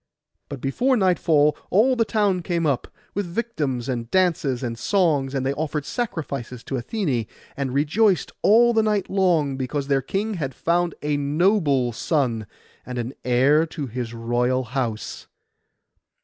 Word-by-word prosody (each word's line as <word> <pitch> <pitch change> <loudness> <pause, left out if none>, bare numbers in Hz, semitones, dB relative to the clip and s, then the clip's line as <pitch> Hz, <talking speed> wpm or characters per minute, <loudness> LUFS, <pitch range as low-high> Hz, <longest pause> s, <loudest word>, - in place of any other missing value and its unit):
But 140 -3 -7
before 245 - +1
nightfall 160 -6 +3
all 240 +7 +4
the 230 -2 +2
town 205 -5 +1
came 170 -1 -1
up, 140 -5 0 0.3
with 200 -2 -2
victims, 155 - -2
and 120 -3 -3
dances, 155 -8 +1
and 120 -2 -2
songs; 145 - +1
and 135 -1 -1
they 135 - +1
offered 150 0 -3
sacrifices 140 - -4
to - - -7
Athené, 130 - -1 0.3
and 135 -2 -2
rejoiced 170 - +2
all 235 +3 +5
the 225 - +4
night 210 -2 0
long, 170 -8 +2
because 135 +2 -3
their 135 -1 +3
king 200 - -2
had 135 -3 -3
found 170 0 0
a 150 -1 0
noble 145 - +2
son, 120 - -1 0.4
and 125 -1 -6
an 120 +2 -3
heir 135 +6 +3
to 155 -2 -5
his 120 -1 -5
royal 120 +2 0
house. 120 -3 -4
145 Hz, 150 wpm, -23 LUFS, 130-185 Hz, 0.4 s, all